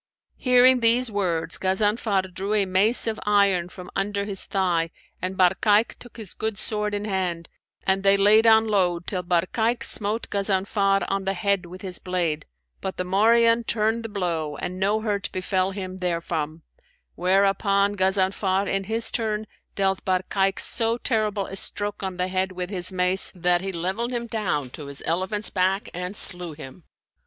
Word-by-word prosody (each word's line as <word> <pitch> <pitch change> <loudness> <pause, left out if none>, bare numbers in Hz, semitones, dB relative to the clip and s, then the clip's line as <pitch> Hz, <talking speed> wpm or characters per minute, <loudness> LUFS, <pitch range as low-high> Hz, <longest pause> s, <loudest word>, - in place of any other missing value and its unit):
Hearing 250 0 +5
these 235 +1 +2
words 175 -5 0
Ghazanfar 195 0 0
drew 195 +4 -2
a 205 -2 +2
mace 195 +6 +5
of 225 -1 -2
iron 200 -4 +2
from 180 -1 -11
under 200 0 -1
his 200 -2 0
thigh 175 -4 0 0.3
and 185 +1 -4
Barkayk 205 +4 +3
took 245 -1 -14
his 215 -5 -7
good 220 -2 -3
sword 210 -1 -2
in 205 0 -3
hand, 180 -4 -2 0.4
and 190 0 +1
they 195 0 +4
laid 215 +3 +5
on 220 0 +6
load 180 -4 +1
till 185 -3 -2
Barkayk 185 +7 0
smote 215 +2 -1
Ghazanfar 195 0 +1
on 195 0 -2
the 195 0 -1
head 200 -2 -1
with 185 +2 -11
his 185 -2 -1
blade, 175 -4 -2 0.3
but 190 - -5
the 180 - -1
morion 230 +5 +3
turned 220 +1 0
the 225 - -7
blow 165 -7 -3
and 185 +1 -5
no 205 +3 +1
hurt 205 -2 -2
befell 185 0 -1
him 190 -1 -7
therefrom; 165 -3 -3 0.5
whereupon 200 +2 +2
Ghazanfar, 190 0 +1
in 195 0 -1
his 225 +2 0
turn, 215 -2 -2 0.3
dealt 195 -1 0
Barkayk 195 +1 0
so 230 0 +3
terrible 215 -5 -1
a 195 - -8
stroke 205 +1 +2
on 190 -2 -4
the 180 0 -1
head 185 0 -1
with 180 +1 -5
his 185 -2 -2
mace, 185 0 +2
that 175 0 +2
he 195 0 -3
levelled 190 +8 -3
him 240 -1 -3
down 185 - -2
to 145 +1 -9
his 140 -1 -8
elephant's 190 +5 -2
back 190 +1 0
and 180 +3 -5
slew 175 -4 0
him. 150 +3 -12
195 Hz, 170 wpm, -24 LUFS, 180-210 Hz, 0.5 s, on